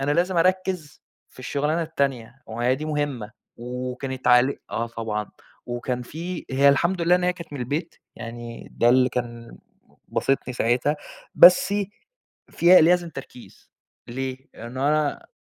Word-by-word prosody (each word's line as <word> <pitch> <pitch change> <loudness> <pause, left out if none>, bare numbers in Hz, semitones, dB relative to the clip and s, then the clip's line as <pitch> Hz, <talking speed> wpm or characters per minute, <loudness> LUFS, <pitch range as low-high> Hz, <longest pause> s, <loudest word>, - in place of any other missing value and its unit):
أنا 140 +2 0
لازم 175 +3 +1
أرَكّز 185 -3 0 0.3
في - - -23
الشغلانة 150 +6 -1
التانية، 135 -5 -3
وما 115 +2 -4
هي 130 - +4
دي 150 +3 -5
مُهمة 145 -8 -2 0.3
وكانت 125 +2 -5
عليه 125 +2 +5
آه، 115 - -2
طبعًا، 110 -3 -4 0.4
وكان 125 +1 -3
في 170 +7 -6
هي 140 +2 +4
الحمد 170 +6 +2
لله 175 +1 +4
أنا 180 0 +1
هي 180 - +3
كانت 170 -4 -11
من 140 - -5
البيت 150 +7 -3 0.2
يعني 115 0 -8
ده 120 - +3
اللي 125 +1 +5
كان 120 -2 -6 0.5
باسطني 135 -2 -1
ساعتها 125 +6 +1 0.4
بسّ 180 +3 +7 0.8
فيها 175 0 +6
لازم 175 +1 +3
تركيز 135 -4 -12 0.4
ليه؟ 130 +1 -4 0.2
لأنه 130 +5 -3
أنا 150 -1 0
135 Hz, 145 wpm, -24 LUFS, 120-160 Hz, 0.8 s, بسّ